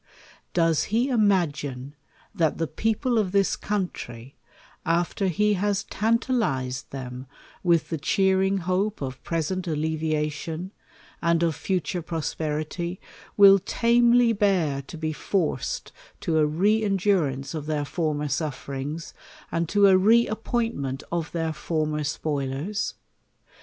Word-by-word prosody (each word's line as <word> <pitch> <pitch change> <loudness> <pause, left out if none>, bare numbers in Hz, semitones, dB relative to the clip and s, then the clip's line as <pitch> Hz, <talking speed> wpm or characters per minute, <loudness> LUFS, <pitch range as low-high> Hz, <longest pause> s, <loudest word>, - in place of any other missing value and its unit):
Does 165 -3 +3
he 235 +6 +1
imagine, 145 - +1 0.4
that 165 -7 +1
the 165 - 0
people 225 - 0
of 195 -4 0
this 200 -1 +3
country,^ 140 - -4 0.5
after 175 +3 0
he 210 +4 +2
has 200 +1 0
tantalized 215 - 0
them 130 -1 -7 0.3
with 170 -3 +2
the 160 - -2
cheering 190 +4 +2
hope 195 +4 0
of 130 -2 -6
present 175 +3 -2
alleviation, 155 +2 -2 0.5
and 170 0 +2
of 165 -2 +1
futnre 180 0 -2
prosperity, 160 +2 -3 0.4
will 200 -1 +8
tamely 235 +3 +4
bear 185 -9 +1
to 150 +5 -10
be 155 0 -2
forced 180 +2 -2 0.3
to 165 -6 +1
a 150 - +4
rc 200 +8 +2
endurance 185 -10 +1
of 155 -2 -5
their 150 -2 -1
former 150 -2 -1
sufferings, 145 +1 -4 0.4
and 165 -1 -1
to 205 -1 +4
a 195 -1 +7
re 230 +5 +5
appointment 220 - -2
of 170 -1 -2
their 165 -2 -1
former 155 -1 -1
spoilers? 145 +6 -2
170 Hz, 120 wpm, -25 LUFS, 150-200 Hz, 0.5 s, will